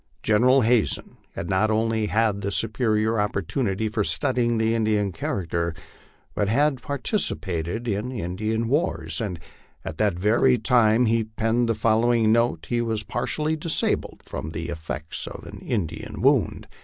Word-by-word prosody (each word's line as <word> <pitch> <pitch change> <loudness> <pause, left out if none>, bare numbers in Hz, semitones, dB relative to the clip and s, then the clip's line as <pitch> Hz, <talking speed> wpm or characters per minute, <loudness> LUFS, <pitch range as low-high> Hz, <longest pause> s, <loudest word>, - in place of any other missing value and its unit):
General 125 +5 +4
Hazen 115 -1 +1 0.2
had 85 - -4
not 100 +3 +2
only 110 0 +1
had 100 -2 0
superior 110 0 +1
opportunities 105 - -1
for 110 -2 0
studying 120 -2 +1
the 110 0 +1
Indian 110 -3 +1
character, 85 -1 -2 0.6
but 100 -1 0
had 135 +3 +2
participated 115 - -2
in 105 +4 -2
Indian 110 +2 -2
wars, 100 - 0
and 95 -6 -3 0.5
at 80 - -6
the 105 - +4
very 110 +8 +3
time 115 0 +4
he 115 0 +2
penned 115 +2 0
the 115 - +2
following 115 +1 +3
note 115 +2 +1
he 120 -1 +1
was 110 -2 -1
partially 150 +8 -2
disabled 160 +1 -1
from 80 - -5
the 85 +1 -4
ef 80 -1 -8
fects 75 +2 -4
of - - -8
an - - -9
Indian 85 -9 -4
wound. - - +2
110 Hz, 145 wpm, -24 LUFS, 100-120 Hz, 0.6 s, General